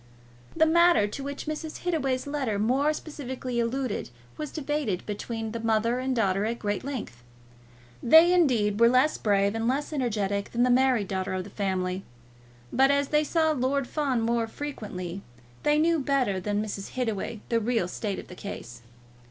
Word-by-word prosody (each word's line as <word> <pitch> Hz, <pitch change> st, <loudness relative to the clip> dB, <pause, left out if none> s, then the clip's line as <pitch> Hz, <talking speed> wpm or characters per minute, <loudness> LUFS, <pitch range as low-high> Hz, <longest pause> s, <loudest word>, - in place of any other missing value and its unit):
The 320 Hz, -, +5 dB
matter 340 Hz, -7 st, +5 dB
to 210 Hz, +7 st, -5 dB
which 280 Hz, 0 st, -5 dB
Mrs. 310 Hz, +1 st, -5 dB
Hittaway's 275 Hz, -7 st, 0 dB
letter 280 Hz, -7 st, -2 dB
more 260 Hz, +8 st, +2 dB
specially 260 Hz, -5 st, -5 dB
alluded 240 Hz, -, -2 dB, 0.3 s
was 305 Hz, -1 st, -5 dB
debated 295 Hz, -, -2 dB
between 225 Hz, +2 st, -4 dB
the 230 Hz, -, -4 dB
mother 225 Hz, +2 st, +1 dB
and 260 Hz, 0 st, -1 dB
daughter 200 Hz, -3 st, +1 dB
at 230 Hz, +2 st, -2 dB
great 205 Hz, -3 st, -2 dB
length. 250 Hz, -, -6 dB, 0.8 s
They, 325 Hz, +7 st, +7 dB
indeed, 230 Hz, -, +2 dB
were 235 Hz, 0 st, +7 dB
less 255 Hz, +5 st, +3 dB
brave 200 Hz, -1 st, +2 dB
and 225 Hz, 0 st, -1 dB
less 285 Hz, +5 st, -1 dB
energetic 205 Hz, -7 st, -1 dB
than 240 Hz, +1 st, +2 dB
was 250 Hz, -, +3 dB
the -, -, +5 dB
married 250 Hz, -5 st, +3 dB
daughter 190 Hz, -1 st, -2 dB
of 185 Hz, -, -2 dB
the 200 Hz, -, -12 dB
family; 190 Hz, -2 st, -2 dB, 0.7 s
but 270 Hz, +1 st, +5 dB
as 280 Hz, 0 st, +2 dB
they 300 Hz, 0 st, +3 dB
saw 315 Hz, +1 st, +2 dB
Lord 275 Hz, -1 st, 0 dB
Fawn 275 Hz, -5 st, 0 dB
more 230 Hz, 0 st, +1 dB
frequently, 200 Hz, -9 st, -6 dB, 0.4 s
they 295 Hz, 0 st, +3 dB
knew 330 Hz, +1 st, +3 dB
better 265 Hz, -8 st, +1 dB
than 205 Hz, +2 st, -1 dB
Mrs. 200 Hz, -2 st, -6 dB
Hittaway 225 Hz, -3 st, -3 dB
the 230 Hz, -, +2 dB
real 225 Hz, -4 st, 0 dB
state 200 Hz, +2 st, -3 dB
of -, -, -8 dB
the -, -, -10 dB
case. 120 Hz, -, -8 dB
240 Hz, 175 wpm, -27 LUFS, 205-280 Hz, 0.8 s, They